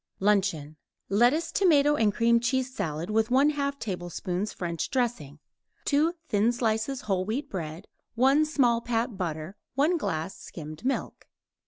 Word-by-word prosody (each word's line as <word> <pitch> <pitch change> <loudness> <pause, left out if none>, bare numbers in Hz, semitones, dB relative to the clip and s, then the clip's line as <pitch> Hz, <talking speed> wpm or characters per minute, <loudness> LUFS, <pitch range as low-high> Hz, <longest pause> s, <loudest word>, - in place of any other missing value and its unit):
LUNCHEON 190 -7 +1 0.3
Lettuce, 250 +11 +3
tomato 295 -7 +4
and 220 -6 +3
cream 235 +2 +3
cheese 260 +2 -1
salad, 170 - -3
with 220 +1 +2
1/2 280 +2 +2
tablespoon 180 - -3
French 170 -5 -4
dressing; 235 - -2 0.5
2 310 +4 +2
thin 215 0 +2
slices 235 +2 -1
whole 195 -3 0
wheat 245 +9 -3
bread; 165 0 -5 0.3
1 270 +5 +4
small 250 -6 +2
pat 235 -1 -1
butter; 170 -1 -4 0.2
1 315 +6 +2
glass 160 - -3
skimmed 155 +1 -9
milk. 265 +1 -3
225 Hz, 135 wpm, -27 LUFS, 185-270 Hz, 0.5 s, tomato